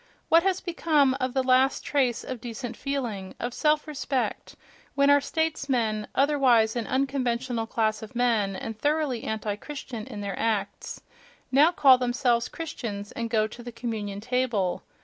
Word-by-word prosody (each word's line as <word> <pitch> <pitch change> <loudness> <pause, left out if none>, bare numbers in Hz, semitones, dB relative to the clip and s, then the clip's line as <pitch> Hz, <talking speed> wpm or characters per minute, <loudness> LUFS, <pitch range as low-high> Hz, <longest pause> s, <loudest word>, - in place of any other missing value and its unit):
What 330 +1 +6
has 380 0 0
become 310 -6 +2
of 255 0 -2
the 265 - +2
last 260 +1 +3
trace 260 -5 +1
of 255 -3 -6
decent 240 0 -6
feeling, 235 -9 -4
of 240 0 -3
self 300 +2 +2
respect, 275 -3 -3 0.4
when 280 0 +4
our 285 0 +5
statesmen, 260 -10 -1
otherwise 260 -6 +3
an 235 -2 -2
unconventional 255 -3 -1
class 215 -1 0
of 220 +1 -10
men 225 -5 +1
and 225 +4 -5
thoroughly 290 0 0
anti 215 -1 -2
Christian 255 -4 -7
in 205 - -7
their 200 -2 -4
acts, 210 -3 -2 0.5
now 290 +6 +6
call 270 -7 +6
themselves 245 -1 +1
Christians 225 -11 -6
and 230 0 -4
go 220 -2 +2
to 220 +2 -9
the 240 0 -8
communion 220 -4 -4
table?... 235 -6 0
245 Hz, 155 wpm, -26 LUFS, 220-275 Hz, 0.5 s, What